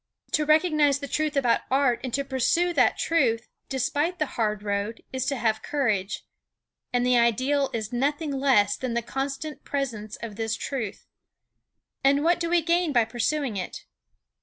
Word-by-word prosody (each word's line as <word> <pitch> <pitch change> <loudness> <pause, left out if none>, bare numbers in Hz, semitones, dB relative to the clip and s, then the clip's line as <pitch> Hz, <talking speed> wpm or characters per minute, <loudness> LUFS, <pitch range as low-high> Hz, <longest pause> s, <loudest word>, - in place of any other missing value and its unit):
To 305 - +2
recognize 305 -3 +4
the 280 -1 -6
truth 305 +1 -1
about 245 -4 +3
art 265 -2 +2
and 255 - -3
to 280 - -1
pursue 305 +7 +1
that - - +3
truth, 240 -8 +1 0.2
despite 290 +6 0
the 305 - +1
hard 210 -2 -1
road, 205 +2 -2
is 260 -1 -2
to 280 - +1
have 220 -3 0
courage. 220 -9 -1 0.7
And 245 0 +1
the 250 -1 +4
Ideal 260 +4 +2
is 220 0 -4
nothing 280 +2 -1
else 205 -7 +4
than 250 -2 -3
the 235 - 0
constant 275 +5 -4
presence 230 -7 -3
of 220 -3 -8
this 225 -1 -1
truth. 225 -8 -4 1.0
And 280 +2 +4
what 345 +1 +3
do 335 -1 -1
we 345 -1 +3
gain 340 0 +2
by 240 -4 +4
pursuing 240 +1 -1
it? 185 - -6
265 Hz, 165 wpm, -26 LUFS, 230-295 Hz, 1.0 s, recognize